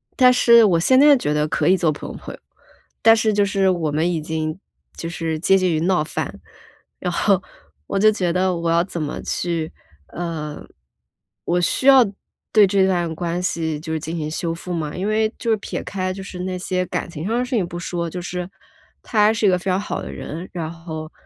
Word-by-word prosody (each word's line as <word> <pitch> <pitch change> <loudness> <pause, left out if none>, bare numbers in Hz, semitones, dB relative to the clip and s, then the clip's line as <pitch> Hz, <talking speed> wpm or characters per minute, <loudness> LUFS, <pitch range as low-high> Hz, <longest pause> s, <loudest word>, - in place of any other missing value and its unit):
但 255 -2 +6
是 235 -2 +6
我 175 -5 +3
现 260 +10 +4
在 290 0 +7
觉 150 -11 -1
得 150 0 +1
可 - - 0
以 190 - +5
做 165 -3 +2
普 145 - -8
通 - - -7
朋 - - -9
友， - - -22 0.6
但 225 0 +7
是 220 -1 +2
就 205 0 +3
是 195 -1 +2
我 170 -5 0
们 160 +4 +1
已 165 -3 -2
经 155 +1 -3 0.4
就 165 - -5
是 165 -2 -3
接 195 +4 +4
近 185 -2 +1
于 155 - +1
闹 180 0 +2
翻。 155 - -5 0.6
然 - - -2
后， - - +2 0.5
我 - - -1
就 215 +2 +6
觉 185 -5 -1
得 185 0 +1
我 170 0 -2
要 170 +1 +4
怎 175 -3 -5
么 150 - -4
去 165 -2 -2 0.4
呃， 160 -3 -5 0.8
我 175 +1 +1
需 220 +9 0
要 265 -3 +8 0.5
对 215 -2 +7
这 190 0 +3
段 175 -3 0
关 175 +1 -2
系 160 -3 -1
就 160 0 -6
是 160 - -1
进 160 +2 -5
行 155 -1 -3
修 165 +1 -2
复 175 +2 -6
吗？ 155 -3 -3
因 190 +3 -2
为 215 +1 +1
就 230 - -1
是 220 - +3
撇 205 - -5
开 185 -1 -3
就 195 +1 -7
是 190 -2 -8
那 185 0 -3
些 185 0 -2
感 - - -3
情 160 -1 -6
上 230 +2 0
的 - - +1
事 255 - -7
情 195 -6 +1
不 175 - -7
说， 170 -1 -3
就 180 +2 -6
是， 180 0 -5 0.5
他 215 - +1
还 215 - +4
是 225 -1 0
一 - - +6
个 180 -1 +2
非 175 - -15
常 185 - +2
好 205 - -4
的 - - -7
人。 155 - -7
然 165 -3 -4
后， 160 -2 -8
175 Hz, 250 characters per minute, -21 LUFS, 165-195 Hz, 0.8 s, 要